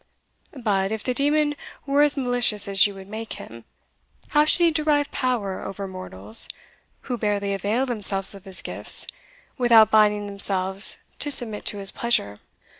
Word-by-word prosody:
But, 200 -5 -1
if 220 -1 -4
the 250 - -2
demon 295 +2 +1 0.3
were 280 +1 +1
as 295 0 +2
malicious 245 -6 0
as 195 0 +4
you 200 - -10
would 190 0 -12
make 220 +2 -7
him, 115 0 -11 0.6
how 300 0 +3
should 345 +3 +2
he 335 - +4
derive 300 -2 0
power 230 -7 -3
over 195 0 -6
mortals, 110 - -1 0.5
who 245 -3 -5
barely 205 -2 -1
avail 210 +7 -1
themselves 205 -6 +2
of 195 -2 -14
his 190 -1 0
gifts, - - +2 0.5
without 230 -3 +5
binding 210 -1 +3
themselves 195 -1 0 0.2
to 290 - +2
submit 235 -7 +3
to 205 - +3
his 195 -1 0
pleasure? 235 - -1
210 Hz, 160 wpm, -23 LUFS, 195-255 Hz, 0.6 s, without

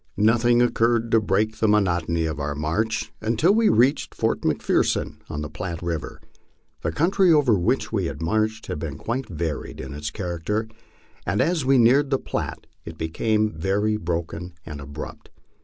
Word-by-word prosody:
Nothing 120 +3 +4
occurred 115 -1 +2
to 115 - +5
break 110 +2 0
the 110 - +3
monotony 85 -5 +2
of 80 -1 -3
our 70 0 -2
march 85 +9 -1
until 115 - +3
we 225 0 +4
reached 125 +6 +2
Fort - - 0
McPherson, - - 0
on 75 - -4
the - - -4
Platte 85 +2 -6
river. 85 -2 -4 0.6
The 80 - -1
country 180 - +3
over 145 -7 +5
which 105 +7 +1
we 100 -5 +1
had 80 - -4
marched 110 +6 0
had 75 - -4
been 75 -2 -5
quite 125 - -3
varied 80 -3 -4
in - - -6
its 75 +1 -4
character, 95 +5 -3 0.6
and 95 +4 -1
as 165 -1 +1
we 135 0 +5
neared 130 +4 +5
the 135 - +2
Platte - - -4 0.2
it 80 -1 -9
became 105 +7 0
very 100 +6 0
broken 85 -1 -4
and 75 -2 -7
abrupt. 70 +2 -8
105 Hz, 170 wpm, -24 LUFS, 80-115 Hz, 0.6 s, to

